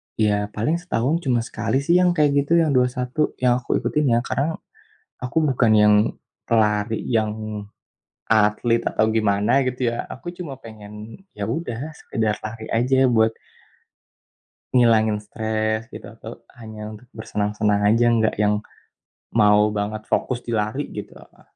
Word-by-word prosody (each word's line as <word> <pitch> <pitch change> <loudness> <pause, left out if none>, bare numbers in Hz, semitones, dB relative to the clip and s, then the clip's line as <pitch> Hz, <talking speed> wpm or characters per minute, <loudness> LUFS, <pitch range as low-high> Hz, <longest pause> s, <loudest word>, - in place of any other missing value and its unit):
ya 105 -1 +1
paling 155 +11 0
setahun 160 -2 -1
cuma 120 -4 +1
sekali 135 +3 -2
sih 170 +4 +4
yang 180 -1 +3
kayak 150 -2 +3
gitu 145 +3 -3
yang 155 - +1
21 125 +3 0
yang 125 0 +3
aku 120 - -2
ikutin 150 -1 0
ya. - - +3
Karena 155 +6 -1 0.6
aku 125 +5 -5
bukan 120 -3 +2
yang 105 0 +6 0.5
pelari 105 -1 +1
yang 110 -3 +1 1.0
atlet 110 +2 +2
atau 110 - +1
gimana 110 +4 +2
gitu 125 -1 -1
ya, - - -4
aku 175 - -9
cuma 145 -8 -7
pengen 105 -2 -12 0.4
ya 105 - -5
udah 120 -3 -3 0.2
sekedar 110 -1 -2
lari 110 0 -7
aja 130 +3 +3
buat 110 -2 +3 1.4
ngilangin 110 -3 +4
stres 110 +1 -2
gitu - - -9
atau - - -10 0.3
hanya 110 -1 -8
untuk 120 +4 -14
bersenang-senang 105 -1 -1
aja, 120 +2 +3
nggak 115 -2 +2
yang 105 0 +3 0.8
mau 105 -1 +5
banget 105 +1 -3
fokus 125 -2 0
di 120 - -2
lari 110 +7 -1
gitu. - - -6
Heeh. - - -20
115 Hz, 145 wpm, -22 LUFS, 105-125 Hz, 1.4 s, yang